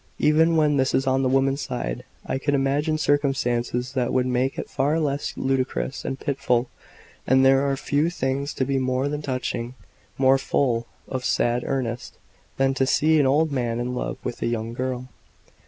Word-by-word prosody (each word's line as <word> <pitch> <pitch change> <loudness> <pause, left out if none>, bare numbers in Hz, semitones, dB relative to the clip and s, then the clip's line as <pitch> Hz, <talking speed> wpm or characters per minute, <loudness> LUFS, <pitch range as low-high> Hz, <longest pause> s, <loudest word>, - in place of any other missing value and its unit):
Even 160 +2 +4
when 150 -2 +3
this 130 -1 +2
is 135 - +1
on 135 0 +2
the 130 - +1
woman's 135 +2 +2
side, 60 - -4 0.2
I 135 - -2
can 145 +1 0
imagine 145 +3 +1
circumstances 130 -4 0
that 125 -3 0
would 130 -1 +2
make 130 +1 0
it - - -4
far 145 +4 0
less 145 -2 -1
ludicrous 135 0 -1
and 135 - -4
pitiful; 130 -4 0 0.6
and 130 +1 +5
there 135 +1 +4
are 135 - 0
few 145 +4 +1
things 140 -3 -2
to 130 - 0
me 135 0 0
more 130 +1 0
touching, 125 -3 -3 0.4
more 135 0 +4
full 120 -4 0 0.2
of 130 -1 -4
sad 120 0 +1
earnest, 125 -3 -3 0.4
than 135 0 +2
to 135 0 +1
see 155 +4 +3
an 140 - +4
old 150 +3 +2
man 120 -3 -1
in 125 +1 -2
love 125 - -3
with 120 - -5
a - - 0
young 115 -1 -2
girl. 125 0 -3
135 Hz, 180 wpm, -24 LUFS, 125-140 Hz, 0.6 s, and